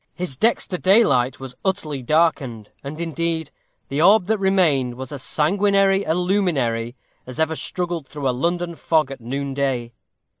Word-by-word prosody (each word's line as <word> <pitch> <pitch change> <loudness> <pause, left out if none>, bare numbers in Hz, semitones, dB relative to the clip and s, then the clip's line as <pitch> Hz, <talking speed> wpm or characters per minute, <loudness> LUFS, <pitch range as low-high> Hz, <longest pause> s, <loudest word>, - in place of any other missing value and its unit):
His 175 -7 -3
dexter 190 - 0
daylight 140 - +3
was 135 -1 -8
utterly 160 -8 -2
darkened, 135 -7 0
and, 145 +3 -7
indeed, 165 -1 -2 0.4
the 140 +2 -1
orb 195 +2 +6
that 220 +2 0
remained 165 -11 +2
was 130 +3 -7
as 145 -3 -6
sanguinary 195 +5 +2
a 160 - +1
luminary 150 - 0 0.3
as 130 +4 -8
ever 160 0 +1
struggled 175 -3 -3
through 145 -1 -4
a - - +3
London 170 +6 -1
fog 155 -4 +1
at 135 - -8
noonday. 135 -1 -2
155 Hz, 150 wpm, -22 LUFS, 135-180 Hz, 0.4 s, orb